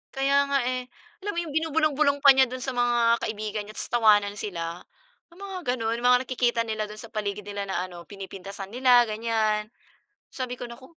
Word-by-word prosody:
Kaya 280 +1 +3
nga 280 0 +2
eh, 255 0 -2 0.4
alam 410 - -2
mo - - 0
yung 310 -4 -7
binubulong-bulong 305 -2 +2
pa 280 - +10
niya 265 0 +5
do'n 255 +1 -6
sa 265 - -2
mga 240 -1 +3
kaibigan 215 -1 -3
niya 215 - -11
tapos - - -5
tawanan 210 -3 +4
sila. 170 -4 -4 0.5
Yung 350 - -18
mga 365 -10 -3
gano'n, 230 -1 -2
mga 250 +1 +5
nakikita 240 -2 0
nila 215 -2 -3
do'n 210 0 -10
sa 230 - -11
paligid 210 -1 -3
nila 200 0 -5
na 180 -2 -1
ano, 175 -2 -10
pinipintasan 195 0 -8
nila, 245 0 +5
ganyan. 215 -1 0 0.6
Sabi 250 -1 -5
ko, 245 - -5
"Naku" 235 +2 -11
235 Hz, 190 wpm, -26 LUFS, 210-260 Hz, 0.6 s, pa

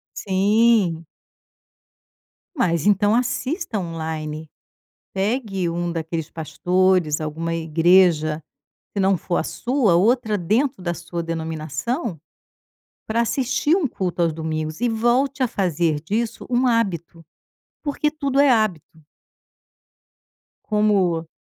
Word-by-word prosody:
Sim. 200 -3 +2 1.5
Mas 170 - +1
então 205 +1 +3
assista 250 - -1
online, 160 -2 -5 0.7
pegue 195 -3 -1
um 175 +1 -2
daqueles 165 -1 -4
pastores, 175 0 +1
alguma 160 +2 -3
igreja, 165 -1 +3 0.5
se 200 - -2
não 190 0 +3
for 175 +2 -3
a - - 0
sua, 245 -7 +1
outra 215 +3 +2
dentro 220 - 0
da 175 - -1
sua 170 +1 -5
denominação, 160 - -3 0.9
pra 225 +1 0
assistir 265 +6 +1
um 360 -7 +1
culto 180 -6 -2
aos 165 -2 +2
domingos 155 +1 -4
e 245 - +2
volte 245 +4 +1
a 245 - 0
fazer 170 -6 0
disso 215 +8 -3
um 250 +1 +2
hábito, 175 -8 -1 0.6
porque 300 0 0
tudo 280 -3 -1
é 285 0 +6
hábito. 190 - 0 1.6
Como 195 -6 +1
185 Hz, 110 wpm, -22 LUFS, 165-235 Hz, 1.6 s, é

